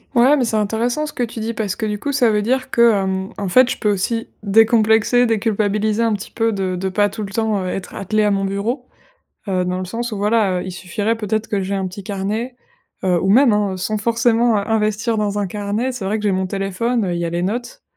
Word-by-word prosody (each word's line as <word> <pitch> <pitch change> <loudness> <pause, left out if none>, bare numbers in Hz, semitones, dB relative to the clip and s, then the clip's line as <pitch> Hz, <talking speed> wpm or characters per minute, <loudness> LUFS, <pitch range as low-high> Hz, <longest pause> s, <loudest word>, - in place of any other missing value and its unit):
Ouais, 255 +5 +6
mais 255 - +1
c'est 220 - -1
intéressant 230 +7 0
ce 300 - -7
que - - -4
tu 230 0 -5
dis 230 +1 -2
parce 210 -3 -2
que, 220 - -3
du 210 -1 -2
coup, 285 - -2
ça 250 -5 +3
veut 210 0 +1
dire 255 +4 -1
que, 235 0 +5
hem, 190 0 -2
en 200 -2 -3
fait, 255 +5 +5
je - - -2
peux 210 -2 +1
aussi 225 +4 -1
décomplexer, 220 +3 +4
déculpabiliser 215 -1 0
un 230 -1 +2
petit 205 0 -5
peu 225 0 0
de 190 -2 -2
de 190 +1 -2
pas 205 +2 +2
tout 215 +2 -6
le 195 - -6
temps, 220 -1 0
heu, 185 - -3
être 185 0 -5
attelée 215 +2 0
à 210 - +2
mon 195 0 0
bureau, 225 +7 -3 0.6
heu, 185 -1 +1
dans 180 0 -2
le 185 - -3
sens 230 +5 -4
où - - -3
voilà, 205 -2 +1
heu, - - -6
il 185 - -5
suffirait 205 +6 -2
peut-être 215 0 -2
que 200 -2 -1
j'aie 195 +1 -2
un 190 -1 -1
petit 190 +2 -8
carnet. 210 +5 -3 0.5
Heu 180 -2 +2
ou 190 - 0
même, 245 +2 +6
hein, 205 -2 0
sans 215 +3 -2
forcément 230 0 +2
investir 215 +2 0
dans 205 -1 -1
un 205 - 0
carnet. 210 +6 -2
C'est 225 -6 -6
vrai 215 +3 0
que - - -6
j'ai 205 - +2
mon 190 0 0
téléphone, 195 +4 -1
heu, 180 - -1
il 170 - -2
y 170 - -1
a 165 - -3
les 175 +1 -2
notes. 240 - -4
210 Hz, 255 wpm, -19 LUFS, 195-230 Hz, 0.6 s, Ouais